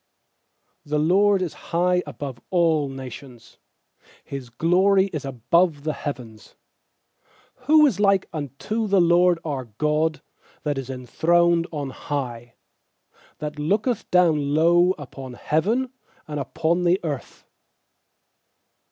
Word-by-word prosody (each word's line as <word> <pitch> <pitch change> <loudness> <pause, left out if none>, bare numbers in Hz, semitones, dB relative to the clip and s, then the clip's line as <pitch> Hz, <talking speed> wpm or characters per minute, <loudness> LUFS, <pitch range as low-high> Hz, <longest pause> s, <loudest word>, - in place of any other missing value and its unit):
4The 150 +1 +1
LORD 200 +1 +4
is 170 - -4 0.2
high 180 +1 +2
above 135 -5 -7
all 165 -5 +2
nations, 130 -2 -10 0.6
His 135 -3 -7
glory 190 +8 +2
is 150 -3 -4
above 140 +5 +1
the 155 0 -1
heavens. 120 -8 -8 1.1
5Who 305 0 +6
is 205 -8 -2
like 195 -2 +3
unto 160 - -3
the 195 -1 +3
LORD 175 0 +4
our 140 -5 -3
God, 150 +7 -1 0.4
That 145 -2 -1
is 135 -1 -7
enthroned 170 +7 +1
on 145 -4 -4
high, 120 -5 -5 0.8
6That 150 0 -5
looketh 205 - -1
down 155 -5 +3
low 175 +3 +4
Upon 135 -3 -9
heaven 225 - 0 0.3
and 150 -1 -4
upon 165 +5 -1
the 180 +2 +3
earth? 145 -6 -6
155 Hz, 115 wpm, -23 LUFS, 140-180 Hz, 1.1 s, 5Who